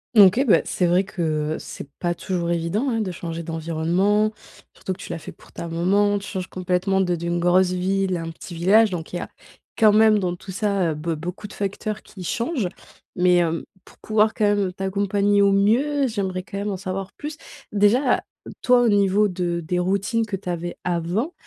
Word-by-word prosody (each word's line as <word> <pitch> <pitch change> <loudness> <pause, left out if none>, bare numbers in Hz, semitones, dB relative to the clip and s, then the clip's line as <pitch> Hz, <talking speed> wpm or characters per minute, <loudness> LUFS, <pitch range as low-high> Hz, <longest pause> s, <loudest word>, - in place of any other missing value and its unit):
OK, 210 +4 +7
bah, 210 - +5
c'est 180 - 0
vrai 180 +2 +3
que 155 -5 -2
c'est 140 - -9
pas 175 -1 -1
toujours 175 -1 -3
évident, 170 +10 0
hein, 225 -2 0
de 195 -4 -2
changer 170 -1 -6
d'environnement, 170 +6 +1 0.4
surtout 190 - -4
que - - -12
tu - - -7
l'as 165 - -4
fait - - -9
pour - - -20
ta 170 - -6
maman. 195 +5 +2
Tu 200 - -7
changes 185 -2 -4
complètement 185 +1 0
de 180 -2 +1
d'une 170 +1 -2
grosse 180 +1 +3
ville 185 0 0
à - - -4
un 165 - -5
petit 170 +2 -10
village, 205 +6 +4
donc 170 -4 -5
il - - -1
y - - -4
a - - -6 0.5
quand 215 -2 +6
même, 215 0 +5
dans 180 -3 -1
tout 190 - -15
ça, 195 -3 0
heu, - - -3
beau 160 +2 -3
beaucoup 175 +6 -6
de - - -13
facteurs 205 +2 -3
qui 185 - -11
changent. 235 - -1 0.5
Mais, 180 0 +4
hem, 165 -1 0 0.2
pour - - -18
pouvoir 215 0 +2
quand 215 - +1
même 205 -3 +1
t'accompagner 200 +1 +1
au 200 - +4
mieux, 260 +9 +2
j'aimerais 195 -5 -2
quand 200 +2 -8
même 205 +1 -2
en 195 - -3
savoir 190 +1 -5
plus. 300 +1 -7 0.3
Déjà, 215 +6 +3 0.4
toi, 250 -1 +5
au 240 - +3
niveau 205 0 +3
de 175 -2 -2
des 170 +2 -2
routines 200 +5 0
que 205 -2 -3
tu 185 - -7
avais 175 0 -4
avant, 180 - -1
190 Hz, 205 wpm, -23 LUFS, 175-205 Hz, 0.5 s, OK